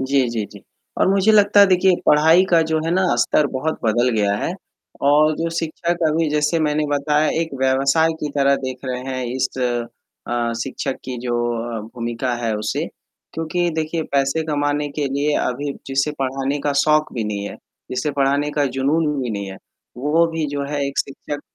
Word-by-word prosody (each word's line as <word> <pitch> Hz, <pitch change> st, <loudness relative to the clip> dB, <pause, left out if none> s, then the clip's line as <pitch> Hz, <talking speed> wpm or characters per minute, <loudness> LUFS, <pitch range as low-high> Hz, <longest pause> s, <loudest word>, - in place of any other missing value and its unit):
जी, 130 Hz, -1 st, +2 dB
जी, 115 Hz, -3 st, -2 dB
जी, 100 Hz, -, -12 dB, 0.4 s
और -, -, +3 dB
मुझे 195 Hz, +2 st, +4 dB
लगता 205 Hz, -1 st, +5 dB
है 200 Hz, -, +8 dB
देखिए 185 Hz, 0 st, +4 dB
पढ़ाई 160 Hz, +5 st, +6 dB
का 170 Hz, -2 st, +5 dB
जो 160 Hz, -, +2 dB
है 165 Hz, -, -1 dB
ना 190 Hz, -, +2 dB, 0.2 s
स्तर 150 Hz, -, +2 dB
बहुत 140 Hz, +4 st, -3 dB
बदल 120 Hz, +3 st, +2 dB
गया 100 Hz, -1 st, +2 dB
है 135 Hz, -, -2 dB, 0.6 s
और 155 Hz, +2 st, +4 dB
जो 165 Hz, 0 st, -2 dB
शिक्षक 170 Hz, +2 st, -2 dB
अभी 160 Hz, +1 st, +1 dB
जैसे 150 Hz, +2 st, +1 dB
मैंने 150 Hz, 0 st, +1 dB
बताया 150 Hz, +1 st, +2 dB
एक 165 Hz, -1 st, -2 dB
व्यवसाय 135 Hz, +5 st, +3 dB
की 150 Hz, -, -2 dB
तरह 140 Hz, 0 st, +4 dB
देख 130 Hz, -1 st, -4 dB
रहे 125 Hz, -1 st, -3 dB
हैं, 130 Hz, -1 st, -3 dB
इस 130 Hz, 0 st, +1 dB, 0.8 s
अ, 120 Hz, -1 st, 0 dB
शिक्षक 135 Hz, 0 st, -4 dB
की 130 Hz, -1 st, -5 dB
जो 120 Hz, -, 0 dB, 0.4 s
अ, -, -, -5 dB
भूमिका 120 Hz, +3 st, -3 dB
है 115 Hz, -, 0 dB
उसे, 105 Hz, -, -2 dB, 0.5 s
क्योंकि 165 Hz, +2 st, -1 dB
देखिए 160 Hz, +1 st, -2 dB
पैसे 140 Hz, +3 st, +1 dB
कमाने 145 Hz, 0 st, 0 dB
के 145 Hz, -, +1 dB
लिए 140 Hz, +2 st, 0 dB
अभी 140 Hz, +3 st, -2 dB
जिसे 135 Hz, +2 st, 0 dB
पढ़ाने 135 Hz, +1 st, -1 dB
का 145 Hz, -, +1 dB
शौक 155 Hz, 0 st, +2 dB
भी 115 Hz, -3 st, -2 dB
नहीं 105 Hz, -1 st, -3 dB
है -, -, -9 dB, 0.3 s
जिसे 130 Hz, +4 st, -1 dB
पढ़ाने 140 Hz, +1 st, +1 dB
का 145 Hz, -1 st, 0 dB
जुनून 150 Hz, +5 st, +1 dB, 0.2 s
भी 125 Hz, -, -3 dB
नहीं 100 Hz, -2 st, -4 dB
है, 95 Hz, -, -8 dB, 0.4 s
वो 150 Hz, +6 st, +2 dB
भी 160 Hz, -1 st, -1 dB
जो 140 Hz, -1 st, -2 dB
है 145 Hz, -1 st, 0 dB
एक 140 Hz, -, -5 dB
शिक्षक 145 Hz, +1 st, -4 dB
145 Hz, 190 wpm, -20 LUFS, 130-155 Hz, 0.8 s, है